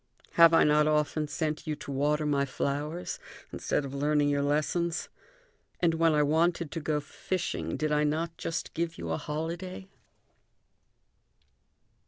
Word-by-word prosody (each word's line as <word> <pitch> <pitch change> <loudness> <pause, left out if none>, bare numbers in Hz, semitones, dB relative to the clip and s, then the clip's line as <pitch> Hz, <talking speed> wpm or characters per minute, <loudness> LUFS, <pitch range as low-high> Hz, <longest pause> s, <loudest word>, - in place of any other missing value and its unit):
Have 165 -1 +7
I 165 - +6
not 150 0 +4
often 150 0 +1
sent 155 +1 -3
you 155 - -1
to 140 - -8
water 150 +3 +1
my 140 -2 +2
flowers 145 +5 -3 0.3
instead 145 - -1
of 135 - -7
learning 145 +1 +2
your 140 0 +1
lessons? 155 +4 0 0.7
And 170 -2 +3
when 165 -1 +3
I 150 - +4
wanted 165 +1 +1
to - - -3
go 150 -1 0
fishing, 145 - -3
did 155 0 -1
I 150 0 +3
not 160 +3 -1
just 165 - -4
give 165 0 -2
you 85 - -4
a 80 - 0
holiday?" 170 +5 -5
150 Hz, 150 wpm, -29 LUFS, 145-165 Hz, 0.7 s, Have